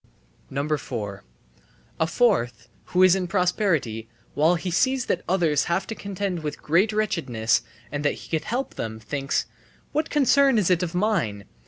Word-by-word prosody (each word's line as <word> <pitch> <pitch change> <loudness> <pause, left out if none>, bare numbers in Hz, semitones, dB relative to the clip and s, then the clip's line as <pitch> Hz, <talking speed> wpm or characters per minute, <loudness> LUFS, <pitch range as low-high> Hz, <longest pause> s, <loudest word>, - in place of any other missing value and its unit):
4. 105 -7 -5 0.8
A 160 - +2
fourth, 120 - +1 0.2
who 180 +1 +3
is 185 -1 +7
in 190 -2 0
prosperity, 175 - 0 0.2
while 160 +4 +3
he 180 +1 -3
sees 260 +7 +2
that - - 0
others 165 -6 +2
have 170 +2 0
to - - -5
contend 200 -4 -3
with 150 -1 -4
great 180 +8 +2
wretchedness 145 - +1 0.3
and 145 0 -3
that 145 - +2
he - - -12
could 160 -1 -1
help 250 +4 -2
them, 110 -1 -5
thinks: 140 +4 -2 0.5
"What 305 +1 -1
concern 280 -3 +4
is 190 -4 +2
it 180 -1 +3
of 175 -1 -3
mine? 170 - 0
175 Hz, 160 wpm, -24 LUFS, 140-205 Hz, 0.8 s, is